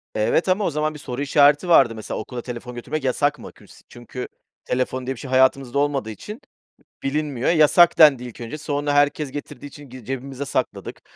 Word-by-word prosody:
Evet 115 - +1
ama 195 +3 +2
o - - +1
zaman 155 0 -2
bir 150 - -10
soru 125 +1 -6
işareti 145 +3 +3
vardı 125 -9 +5
mesela 110 - -6
okula 120 +3 -6
telefon 125 0 -8
götürmek 135 +5 -5
yasak 145 +3 0
mı? - - -10
Küls - - -19
çünkü 120 +1 -8 0.4
telefon 130 0 -2
diye 130 - -3
bir - - -13
şey 135 - -8
hayatımızda 130 0 +2
olmadığı 140 -5 -1
için, 210 - -9 0.6
bilinmiyor. 140 -3 -1
Yasak 170 +1 +5
dendi 145 -6 +6
ilk 120 -1 -10
önce 120 +6 -6
sonra 145 -1 -2
herkes 145 0 +1
getirdiği 145 0 -8
için 145 0 -13
gi 125 -2 -12
cebimize 135 +2 -5
sakladık. 140 - -4
135 Hz, 190 wpm, -22 LUFS, 125-150 Hz, 0.6 s, dendi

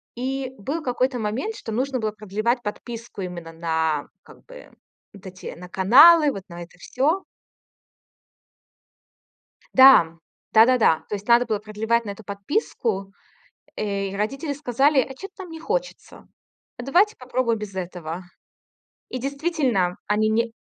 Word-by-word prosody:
И 260 +1 -3
был 285 +11 -4
какой-то 250 0 0
момент, 250 - -3
что 225 - -7
нужно 255 +3 -1
было 215 -1 -1
продлевать 215 +4 -2
подписку 230 0 -7
именно 175 -2 -7
на 160 -2 -1 0.2
как - - -18
бы - - -14 0.4
вот 195 -1 -15
эти 185 0 -8
на 180 +1 -10
каналы, 290 - +7
вот 195 -5 -7
на 170 0 -8
это 175 +1 -17
всё. 310 - 0 2.5
Да. 260 -12 +7 0.4
Да-да-да, 225 -7 +5
то - - -3
есть 205 +1 -6
надо 235 +1 +5
было 215 -2 -1
продлевать 220 +2 -1
на 205 - -5
эту 200 +1 -10
подписку, 200 - -2 0.7
э, 200 -2 -2
и 195 - -7
родители 275 +9 -2
сказали: 280 0 +2
"А 265 +1 -1
чё-то 390 +3 -9
нам 355 - -11
не 325 - -8
хочется. - - -5 0.5
А 245 - -7
давайте 375 - +3
попробуем 250 -2 -1
без 200 -2 -7
этого". 175 -1 -6 0.9
И 255 - -4
действительно 275 - -1
они 215 +1 +2
не 230 +1 0
230 Hz, 140 wpm, -23 LUFS, 195-270 Hz, 2.5 s, каналы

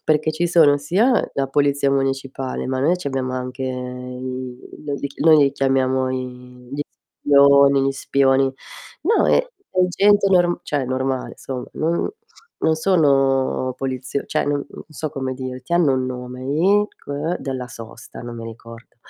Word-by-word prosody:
perché 155 0 +2
ci 170 +3 0
sono 160 -4 +5
sia 205 - +2
la 135 -1 -1
polizia 140 0 +2
municipale, 135 -1 -2
ma 130 0 -2
noi 160 +6 +3
c'abbiamo 135 -6 -3
anche 125 +1 -5
i 125 0 -5 0.3
no 145 - -2
li 140 - -3 0.2
noi 160 -1 +7
li 140 -2 +4
chiamiamo 130 -1 +1
i 125 -1 -7
gli 140 +2 -4 0.4
spioni 140 -1 +6
gli 135 - +2
spioni. 135 0 +2 0.5
No 430 +8 +3
è - - +4 0.3
è - - -5
gente 200 +2 +4
norm 175 -2 +3
cioè, 145 -3 -2
normale 130 0 -2
somma, 130 -2 -6
non 165 +2 -1 0.5
non 160 - +2
sono 135 -7 +2
polizio 135 +1 -3
cioè, - - 0
non 145 -1 -1
non - - -11
so 155 0 -5
come 135 -3 -3
dirti, 130 +2 -7
hanno 170 -6 +4
un 130 0 -1
nome 125 0 -6
gli 185 +10 +3
c - - -25
ehm, 150 +5 -2
della 130 -2 -5
sosta, 115 0 -11
non 120 -1 -7
mi 115 - -7
ricordo. 115 +1 -12
135 Hz, 160 wpm, -21 LUFS, 130-150 Hz, 0.5 s, noi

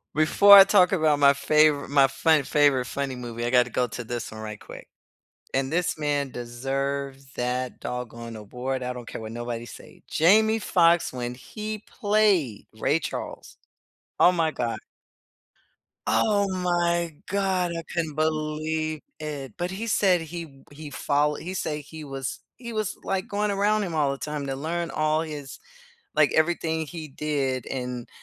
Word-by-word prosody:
Before 200 +6 +8
I 195 - +12
talk 190 -2 +4
about 155 -5 +2
my 140 -1 +7
favori 150 0 +3
my 140 -1 +5
fun 155 +2 +2
favorite 145 -3 +3
funny 135 +1 -3
movie, 120 -1 -5
I - - 0
gotta 125 0 +4
go 125 +1 0
to 120 - -6
this 120 -1 -5
one 110 - -8
right 105 -1 -7
quick. - - -11 0.7
And 135 +1 0
this 175 -1 0
man 145 -2 -1
deserves 135 +3 -4
that 125 0 -2
doggone 115 -2 -6
award, 125 +5 -4
I 125 0 -2
don't 120 -1 -9
care - - -6
what 110 0 -7
nobody 120 0 -4
say. - - -13
Jamie 220 +7 +4
Foxx 170 -5 +3
when 125 -1 -4
he 215 - -7 0.2
played 205 - +2
Ray 145 +7 +2
Charles, 165 - -6 0.6
oh 180 - +7
my 165 -3 +1
god. 120 -6 -3 1.3
Oh 205 -2 +2
my 175 -3 0
god 190 -3 0
I 165 - -5
couldn't 160 -3 -2
believe 155 0 -1 0.2
it. 145 -5 -6
But 175 +1 -2
he 210 +5 -4
said 190 -5 +3
he 165 +1 -6
w 135 -3 -18
he 150 +1 -9
follow 145 +1 +1
he 180 +5 -6
say 150 -5 -3
he 155 +2 -10
was 135 -2 -5 0.2
he 235 -1 -7
was, 215 -2 -2
like, 190 -1 -1
going 205 0 -1
around 205 +2 +2
him 175 -4 -4
all 145 -3 +2
the 140 - -4
time 150 0 -4
to 135 - -2
learn 170 +4 -3
all 155 0 +1
his 150 -4 -7 0.6
like, 150 -1 +4
everything 160 -1 +1
he 160 0 -7
did 135 -3 -2
and, 125 -2 -5
150 Hz, 165 wpm, -25 LUFS, 130-175 Hz, 1.3 s, I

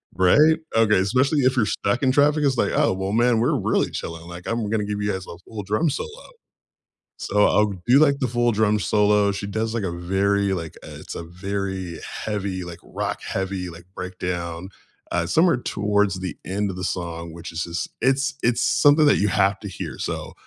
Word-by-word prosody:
right, 145 - +5 0.2
okay, 110 -2 +4
especially 130 +9 +2
if 130 0 +3
you're 115 - +4
stuck 105 +5 -1
in 130 - +4
traffic, 145 +2 +3
it's, 135 -3 +2
like, - - +1
"Oh, - - +3
well, 95 +1 -3
man, 120 0 +3
we're 120 - +2
really - - +1
chilling, 85 0 -6
like, 85 0 -9
I'm 115 -2 -1
gonna 105 -1 0
give 105 0 -3
you 105 0 0
guys 95 -1 -4
a 85 - -9
full 105 +3 -8
drum 105 - +1
solo," 460 - -6 0.9
so, 105 0 +2
I'll 105 -1 +3
do, 125 +3 +6
like, 140 -2 +4
the 130 - +1
full 120 0 +1
drum 105 0 +2
solo, 105 -1 +3
she 100 +1 -4
does, 110 +3 -2
like, 115 - -1
a 95 - -1
very, 95 +3 0
like, 85 -3 -6
uh, - - -9
it's - - -8
a - - -5
very 95 -1 -4 0.2
heavy, 100 -4 -3
like, 85 -1 -8
rock - - -4
heavy, 95 -1 -3
like, 85 +1 -12
breakdown, 90 -1 -4 0.4
uh, 85 -1 0
somewhere 160 - +3
towards 100 -4 0
the 95 -1 -4
end 100 +2 -1
of 95 - -6
the 90 - -4
song, 85 -2 -4
which 85 0 -8
is 80 +1 -2
just 85 0 -4
it's 135 +1 +2
it's 120 -1 +2
something 145 +2 +5
that 145 - +5
you 105 - +2
have 95 +1 +2
to 105 - -6
hear 95 - -6
so, - - -4
100 Hz, 205 wpm, -23 LUFS, 90-120 Hz, 0.9 s, do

